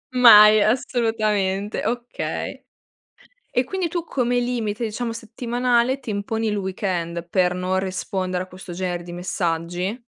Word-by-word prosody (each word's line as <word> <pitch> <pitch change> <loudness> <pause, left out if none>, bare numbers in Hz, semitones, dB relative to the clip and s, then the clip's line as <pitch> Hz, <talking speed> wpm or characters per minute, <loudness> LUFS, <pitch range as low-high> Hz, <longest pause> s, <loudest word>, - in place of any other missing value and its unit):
Mai. 215 -3 +9
Assolutamente. 215 -5 0
Okay. 245 0 -4 0.9
E, 250 - +1
quindi 375 +3 -2
tu 340 0 -3
come 245 -5 0
limite, 235 -3 -2
diciamo, 230 +2 -3
settimanale 240 +2 0
ti 235 - -7
imponi 220 +2 -2
il 210 - -1
weekend, 180 -3 -3
per 180 0 +2
non 185 +1 -1
rispondere 185 -1 -3
a - - -17
questo 185 -1 -10
genere 175 -1 -3
di 175 0 -9
messaggi? 175 +4 -2
210 Hz, 130 wpm, -22 LUFS, 185-240 Hz, 0.9 s, Mai